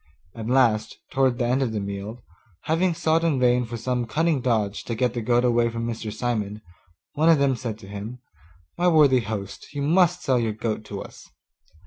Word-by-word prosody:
At 110 -1 -7
last, 115 -4 +2
towards 130 -2 +2
the 125 - 0
end 125 +3 +1
of 120 -4 -1
the 105 - -1
meal, 100 +4 -6 0.4
having 170 +2 +1
sought 160 +1 +1
in 155 -5 +1
vain 125 0 +3
for 115 +1 -6
some 125 0 -2
cunning 155 +3 +1
dodge 110 -5 0
to 115 - -3
get 125 +1 0
the 120 - -3
goat 120 +2 +2
away 120 -1 +3
from 115 0 -4
Mr. 115 -2 -4
Simon, 110 -2 -3 0.5
one 155 +2 +3
of 165 - +6
them 140 -2 +2
said 115 -3 -5
to 105 -3 -13
him, 105 +5 -7 0.6
'My 180 - +3
worthy 150 -6 +5
host, 105 -3 -6
you 140 - -2
must 175 +3 +3
sell 130 -3 +2
your 115 -2 -1
goat 110 0 -3
to 100 -2 -6
us. - - -14
120 Hz, 200 wpm, -24 LUFS, 110-135 Hz, 0.6 s, of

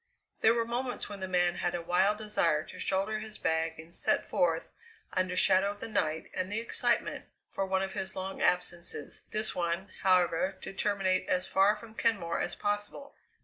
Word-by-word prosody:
There 225 +1 +5
were 230 -1 +1
moments 245 +1 -2
when 205 -1 -7
the 190 - -3
man 175 -1 +2
had 175 - -1
a 175 - -2
wild 190 +4 +3
desire 170 -8 +1
to - - -11
shoulder 195 +3 0
his 215 0 -8
bag 160 0 0
and 160 +2 -11
set - - +1
forth 165 -2 +1 0.5
under 185 -1 0
shadow 185 +2 +4
of 205 0 -6
the - - -5
night 160 -7 -1
and 185 +1 -2
the 210 - 0
excitement, 230 - +1 0.3
for 195 - -2
one 190 0 +1
of 190 - -4
his 190 -2 -3
long 190 0 -4
absences, 175 -3 -1
this 215 0 +2
one, 175 +2 -2
however, 185 0 +3
to - - -6
terminate 190 -2 0
as 185 0 +2
far 195 +2 +4
from 220 +1 -12
Kenmore 200 -8 0
as - - -2
possible. 205 +7 -3
190 Hz, 190 wpm, -31 LUFS, 175-210 Hz, 0.5 s, There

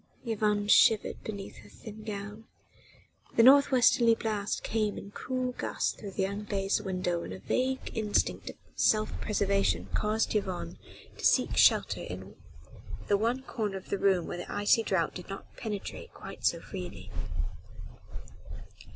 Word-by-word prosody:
Yvonne 210 -2 0
shivered 215 0 +4
beneath 200 -2 -7
her - - -14
thin 215 -1 -11
gown. 210 +1 -6 0.9
The 230 - +6
north 280 +3 +8
westerly 240 -3 +5
blast 210 -3 -2
came 215 -2 -1
in 200 - -8
cruel 255 +3 -2
gusts - - -2
through 200 -3 -9
the 190 - 0
unglazed 200 0 -1
window 180 -3 -1
and - - -7
a 95 - -5
vague 260 - -1
instinct 215 -2 0
of - - -9 0.2
self 215 0 +2
preservation 200 -2 +1
caused 215 +1 +1
Yvonne 190 - -3 0.4
to - - -9
seek - - +3
shelter - - +4
in 95 +2 -8 0.7
the 205 - +5
one 240 +4 0
corner 210 -7 -3
of 190 - -11
the 200 - 0
room 190 -3 +3
where - - -5
the 175 - -7
icy 205 +2 +3
draught 190 -7 0
did 180 0 -9
not 195 - -9
penetrate 210 -3 -6
quite - - -8
so - - +1
freely. 90 -1 -8
205 Hz, 150 wpm, -30 LUFS, 195-225 Hz, 0.9 s, north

